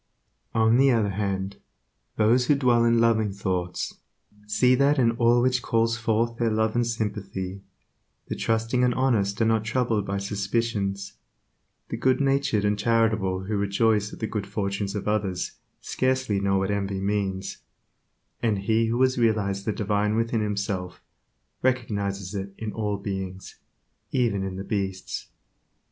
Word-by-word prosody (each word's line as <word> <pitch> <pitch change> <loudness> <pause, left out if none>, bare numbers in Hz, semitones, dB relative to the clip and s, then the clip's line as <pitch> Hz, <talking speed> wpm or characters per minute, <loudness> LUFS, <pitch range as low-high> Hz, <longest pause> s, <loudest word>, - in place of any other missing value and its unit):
On 110 +1 +4
the 135 +1 +5
other 110 -5 +2
hand, 100 -1 -2 0.6
those 120 +4 +3
who 145 - +5
dwell 125 -4 +3
in 115 0 +4
loving 110 -3 +3
thoughts, 95 -3 -3 0.5
see 110 +4 +3
that 140 +3 +3
in 120 -3 +4
all 120 +1 +3
which 125 -1 +2
calls 115 0 +1
forth 115 +1 0
their 115 -1 +2
love 110 0 +1
and 120 -1 +2
sympathy; 100 -4 -4 0.7
the - - -3
trusting 115 +3 0
and 125 -1 +2
honest 110 -7 +1
are - - +3
not 110 -1 +2
troubled 115 -3 0
by 100 0 -1
suspicions; 100 0 -2 0.7
the - - -3
good 130 0 +2
natured 135 -7 +1
and 105 0 +1
charitable 110 -4 +1
who 105 +3 -2
rejoice 105 +1 +1
at - - -9
the 110 - -3
good 105 -3 -3
fortune 100 0 -2
of 100 - -5
others, 100 -4 -1 0.2
scarcely 130 -5 0
know 100 0 +1
what 95 +1 0
envy 100 -1 -1
means; 95 -1 -2 0.8
and 110 -3 +1
he 115 +2 +2
who 115 +2 0
has 130 -1 +2
realized 100 -4 +1
the 110 - +1
Divine 105 0 0
within 115 0 0
himself 100 -3 -3 0.6
recognizes 100 -6 -1
it 100 -1 -5
in 110 -1 -4
all 105 -2 -1
beings, 95 -2 -6 0.5
even 115 -7 +1
in 95 -1 -4
the 95 - -5
beasts. 95 -2 -3
105 Hz, 155 wpm, -25 LUFS, 100-115 Hz, 0.8 s, the